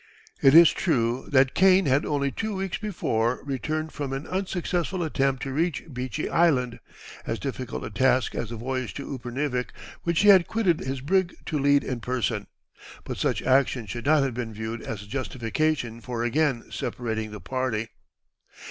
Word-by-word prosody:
It 135 Hz, +2 st, +6 dB
is 170 Hz, -1 st, +9 dB
true 125 Hz, -6 st, 0 dB
that 130 Hz, -1 st, +4 dB
Kane 190 Hz, 0 st, +5 dB
had 140 Hz, +1 st, +2 dB
only 140 Hz, -2 st, 0 dB
two 220 Hz, +4 st, -3 dB
weeks 190 Hz, -1 st, -3 dB
before 125 Hz, -, -1 dB
returned 155 Hz, +3 st, -2 dB
from 140 Hz, -3 st, -4 dB
an 135 Hz, +3 st, -4 dB
unsuccessful 185 Hz, -1 st, -2 dB
attempt 135 Hz, -4 st, 0 dB
to 135 Hz, -, -4 dB
reach 165 Hz, +2 st, 0 dB
Beechy 125 Hz, +4 st, -3 dB
Island, 135 Hz, -8 st, +2 dB, 0.5 s
as 115 Hz, -, -1 dB
difficult 130 Hz, -2 st, -5 dB
a -, -, -6 dB
task 130 Hz, +3 st, +2 dB
as 115 Hz, -, -3 dB
the 120 Hz, -, -5 dB
voyage 130 Hz, +1 st, -3 dB
to 140 Hz, -, -6 dB
Upernivik, 125 Hz, +1 st, -2 dB, 0.3 s
which 170 Hz, -2 st, +1 dB
he 205 Hz, -, +6 dB
had 190 Hz, -3 st, +7 dB
quitted 190 Hz, -8 st, +1 dB
his 130 Hz, 0 st, -4 dB
brig 185 Hz, +5 st, +1 dB
to 150 Hz, -, -1 dB
lead 140 Hz, 0 st, +4 dB
in 125 Hz, -2 st, -3 dB
person; 115 Hz, -3 st, -2 dB, 0.6 s
but -, -, -5 dB
such -, -, 0 dB
action 130 Hz, -2 st, +2 dB
should 120 Hz, +6 st, -6 dB
not 155 Hz, -1 st, +5 dB
have 135 Hz, -2 st, -1 dB
been 115 Hz, -2 st, -5 dB
viewed 110 Hz, +1 st, -4 dB
as 105 Hz, -3 st, -6 dB
a -, -, -14 dB
justification 125 Hz, +1 st, -2 dB
for 120 Hz, -1 st, -3 dB
again 130 Hz, 0 st, 0 dB
separating 110 Hz, -2 st, -3 dB
the 105 Hz, 0 st, -8 dB
party. 125 Hz, -3 st, -2 dB
135 Hz, 175 wpm, -26 LUFS, 120-155 Hz, 0.6 s, is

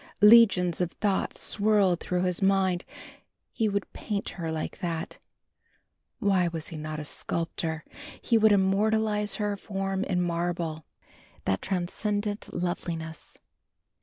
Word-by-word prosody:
Legions 210 Hz, -6 st, +7 dB
of 175 Hz, -1 st, -1 dB
thoughts 200 Hz, -2 st, -1 dB
swirled 205 Hz, -4 st, +2 dB
through 180 Hz, 0 st, -1 dB
his 180 Hz, 0 st, 0 dB
mind. 190 Hz, -2 st, +2 dB, 0.7 s
He 220 Hz, -2 st, 0 dB
would 200 Hz, 0 st, -3 dB
paint 205 Hz, -2 st, -3 dB
her 165 Hz, -3 st, -4 dB
like 160 Hz, -1 st, -4 dB
that. 170 Hz, -4 st, -4 dB, 1.0 s
Why 195 Hz, -6 st, +2 dB
was 165 Hz, -2 st, -4 dB
he 165 Hz, -, -8 dB
not 155 Hz, 0 st, -5 dB
a 150 Hz, -, -6 dB
sculptor? 160 Hz, 0 st, -3 dB, 0.3 s
He 235 Hz, -, +1 dB
would 220 Hz, -1 st, +6 dB
immortalise 210 Hz, +2 st, +2 dB
her 210 Hz, -1 st, -1 dB
form 195 Hz, -1 st, -3 dB
in 180 Hz, -2 st, 0 dB
marble. 170 Hz, -2 st, -2 dB, 0.6 s
What 95 Hz, -1 st, 0 dB
transcendent 205 Hz, +3 st, -2 dB
loveliness! 165 Hz, -2 st, -4 dB
190 Hz, 125 wpm, -27 LUFS, 170-205 Hz, 1.0 s, Legions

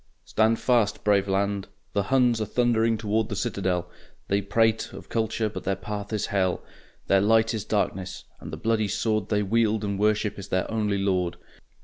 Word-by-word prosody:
Stand 110 Hz, +1 st, +2 dB
fast, 120 Hz, -5 st, +1 dB
brave 100 Hz, -1 st, +3 dB
land! 100 Hz, 0 st, 0 dB, 0.3 s
The 100 Hz, -, +2 dB
Huns 125 Hz, -4 st, +3 dB
are -, -, 0 dB
thundering 115 Hz, 0 st, +2 dB
toward 110 Hz, 0 st, 0 dB
the 105 Hz, -, -3 dB
citadel; 90 Hz, -3 st, -1 dB, 0.4 s
They 100 Hz, +1 st, +2 dB
prate 110 Hz, +2 st, +1 dB
of -, -, -10 dB
Culture 110 Hz, -1 st, 0 dB
but 105 Hz, -, -6 dB
their 95 Hz, -, 0 dB
path 105 Hz, +1 st, -6 dB
is 105 Hz, -1 st, -1 dB
Hell; 95 Hz, -2 st, +1 dB, 0.4 s
Their 95 Hz, 0 st, +4 dB
light 110 Hz, +2 st, +3 dB
is 110 Hz, -2 st, -3 dB
darkness, 95 Hz, -3 st, -2 dB, 0.2 s
and 75 Hz, -, -9 dB
the 80 Hz, -, -5 dB
bloody 110 Hz, +4 st, +1 dB
sword 110 Hz, 0 st, -1 dB
They 105 Hz, -1 st, +1 dB
wield 110 Hz, +1 st, +1 dB
and 100 Hz, -1 st, -2 dB
worship 105 Hz, 0 st, +1 dB
is 100 Hz, -, -7 dB
their 95 Hz, -2 st, 0 dB
only 105 Hz, -3 st, 0 dB
Lord. 90 Hz, -3 st, 0 dB
105 Hz, 180 wpm, -26 LUFS, 100-110 Hz, 0.4 s, Their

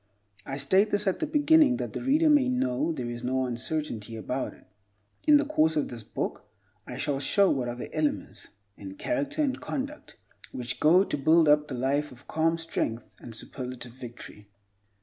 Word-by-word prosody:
I 135 Hz, -, -4 dB
state 190 Hz, +9 st, +3 dB
this 205 Hz, 0 st, 0 dB
at 190 Hz, -, 0 dB
the 315 Hz, -, -1 dB
beginning, 295 Hz, -2 st, +4 dB
that -, -, -4 dB
the -, -, -4 dB
reader 295 Hz, +5 st, +3 dB
may 290 Hz, -4 st, +5 dB
know 155 Hz, -, 0 dB
there 125 Hz, -6 st, -4 dB
is 120 Hz, 0 st, -7 dB
no 130 Hz, +1 st, 0 dB
uncertainty 120 Hz, -2 st, -3 dB
about 125 Hz, +4 st, -3 dB
it. -, -, -22 dB, 0.6 s
In 300 Hz, -1 st, +8 dB
the 290 Hz, -, +1 dB
course 160 Hz, -, +2 dB
of 150 Hz, -, 0 dB
this 120 Hz, -2 st, -7 dB
book 105 Hz, -, -5 dB, 0.4 s
I -, -, -6 dB
shall 140 Hz, -2 st, -1 dB
show 195 Hz, +7 st, +3 dB
what 130 Hz, -3 st, -1 dB
are 120 Hz, -, -4 dB
the 125 Hz, -, -8 dB
elements, 155 Hz, -1 st, -2 dB, 0.3 s
in 95 Hz, -1 st, -9 dB
character 300 Hz, 0 st, -1 dB
and 270 Hz, -3 st, -1 dB
conduct, 285 Hz, +2 st, -5 dB, 0.3 s
which 125 Hz, -1 st, -5 dB
go 175 Hz, +5 st, +6 dB
to -, -, -3 dB
build 160 Hz, +3 st, +5 dB
up 150 Hz, 0 st, +4 dB
the 130 Hz, -, -5 dB
life 140 Hz, +4 st, 0 dB
of 125 Hz, +2 st, -16 dB
calm 165 Hz, +1 st, +1 dB
strength 160 Hz, -8 st, -3 dB
and 115 Hz, -, -10 dB
superlative 125 Hz, 0 st, -7 dB
victory. 120 Hz, -4 st, -11 dB
150 Hz, 190 wpm, -27 LUFS, -, 0.6 s, In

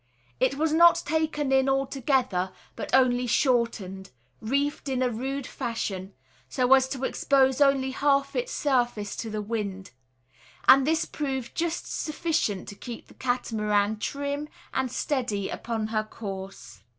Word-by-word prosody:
It -, -, +2 dB
was 310 Hz, +2 st, +1 dB
not 340 Hz, +1 st, +6 dB
taken 305 Hz, -2 st, 0 dB
in 265 Hz, 0 st, +4 dB
altogether, 260 Hz, -8 st, 0 dB, 0.2 s
but -, -, -5 dB
only 250 Hz, -1 st, +3 dB
"shortened," 230 Hz, -7 st, 0 dB, 0.3 s
reefed 280 Hz, +5 st, -1 dB
in 260 Hz, -1 st, 0 dB
a 250 Hz, -, +1 dB
rude 265 Hz, +4 st, -3 dB
fashion, 205 Hz, -8 st, -4 dB, 0.3 s
so 255 Hz, 0 st, +3 dB
as 265 Hz, 0 st, +4 dB
to 265 Hz, -1 st, -5 dB
expose 265 Hz, 0 st, +2 dB
only 275 Hz, -2 st, +4 dB
half 275 Hz, 0 st, +1 dB
its -, -, -1 dB
surface 240 Hz, -7 st, 0 dB
to 225 Hz, -, -4 dB
the 215 Hz, -1 st, -3 dB
wind; 200 Hz, -, -4 dB, 0.8 s
and 270 Hz, +1 st, +7 dB
this 320 Hz, 0 st, +2 dB
proved 265 Hz, -5 st, -4 dB
just 335 Hz, 0 st, -2 dB
sufficient 305 Hz, -, -1 dB
to 200 Hz, -, -9 dB
keep 235 Hz, +2 st, -9 dB
the -, -, -15 dB
Catamaran 215 Hz, -4 st, 0 dB
"trim" 285 Hz, +4 st, -3 dB, 0.2 s
and 265 Hz, -1 st, 0 dB
steady 240 Hz, -10 st, -1 dB
upon 225 Hz, -2 st, -3 dB
her 215 Hz, -1 st, 0 dB
course. 195 Hz, -, -8 dB
260 Hz, 140 wpm, -27 LUFS, 215-280 Hz, 0.8 s, and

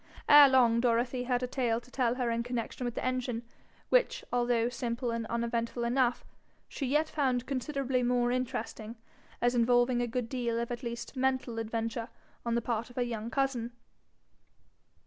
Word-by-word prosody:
Ere 290 Hz, -1 st, +9 dB
long 240 Hz, -3 st, +4 dB
Dorothy 245 Hz, +1 st, +1 dB
had 250 Hz, 0 st, 0 dB
a -, -, 0 dB
tale 240 Hz, -3 st, 0 dB
to 245 Hz, +1 st, -20 dB
tell 245 Hz, -3 st, +1 dB
her 250 Hz, -2 st, -1 dB
in 230 Hz, 0 st, 0 dB
connection 245 Hz, +1 st, -4 dB
with 240 Hz, -, -3 dB
the -, -, -3 dB
engine, 250 Hz, -2 st, -2 dB, 0.5 s
which, -, -, +2 dB
although 240 Hz, -1 st, +2 dB
simple 240 Hz, 0 st, -2 dB
and 230 Hz, -1 st, -3 dB
uneventful 235 Hz, +1 st, -2 dB
enough, 245 Hz, 0 st, +1 dB, 0.4 s
she 275 Hz, -, -4 dB
yet 300 Hz, +4 st, +2 dB
found 260 Hz, -5 st, 0 dB
considerably 270 Hz, -1 st, -1 dB
more 245 Hz, 0 st, +2 dB
interesting, 240 Hz, -3 st, -3 dB, 0.5 s
as 245 Hz, 0 st, +3 dB
involving 245 Hz, +1 st, +3 dB
a 240 Hz, -, 0 dB
good 240 Hz, 0 st, -2 dB
deal 235 Hz, -2 st, -2 dB
of 235 Hz, +1 st, -3 dB
at 240 Hz, 0 st, -4 dB
least 235 Hz, +1 st, -6 dB
mental 260 Hz, -3 st, 0 dB
adventure 230 Hz, +1 st, -3 dB, 0.3 s
on 235 Hz, -1 st, -1 dB
the 235 Hz, -, 0 dB
part 230 Hz, 0 st, -2 dB
of 245 Hz, -, -15 dB
her 250 Hz, -, +1 dB
young 230 Hz, -2 st, -4 dB
cousin. 245 Hz, -2 st, -1 dB
245 Hz, 170 wpm, -30 LUFS, 235-255 Hz, 0.5 s, Ere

